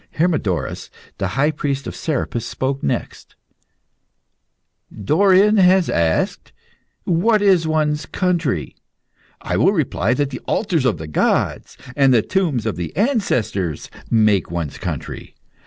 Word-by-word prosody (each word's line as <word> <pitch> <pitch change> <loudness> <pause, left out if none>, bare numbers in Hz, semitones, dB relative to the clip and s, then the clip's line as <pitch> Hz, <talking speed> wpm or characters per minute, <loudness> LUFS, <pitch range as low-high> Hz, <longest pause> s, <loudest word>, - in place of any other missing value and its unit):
Hermodorus, 110 - -1 0.3
the 95 - 0
High 145 +3 +3
Priest 140 -3 -3
of - - -6
Serapis, 130 -6 -2
spoke 130 +4 -3
next - - -4 1.6
"Dorion 195 - +3
has 185 -1 +4
asked, 80 -1 0 0.5
'What 205 +5 +2
is 185 -5 +3
one's 155 -1 0
country?' 170 - -1 0.7
I - - -1
will - - +3
reply 115 +7 0
that 145 0 -1
the 130 - -5
altars 175 - 0
of 110 -9 +1
the 80 - -7
gods 75 - -1 0.2
and 135 -2 +4
the 115 -4 +4
tombs 160 - -1
of 110 -5 -3 0.2
ancestors 125 - -1 0.2
make 105 -5 +2
one's 85 -4 -4
country. - - -6
140 Hz, 125 wpm, -20 LUFS, 105-180 Hz, 1.6 s, has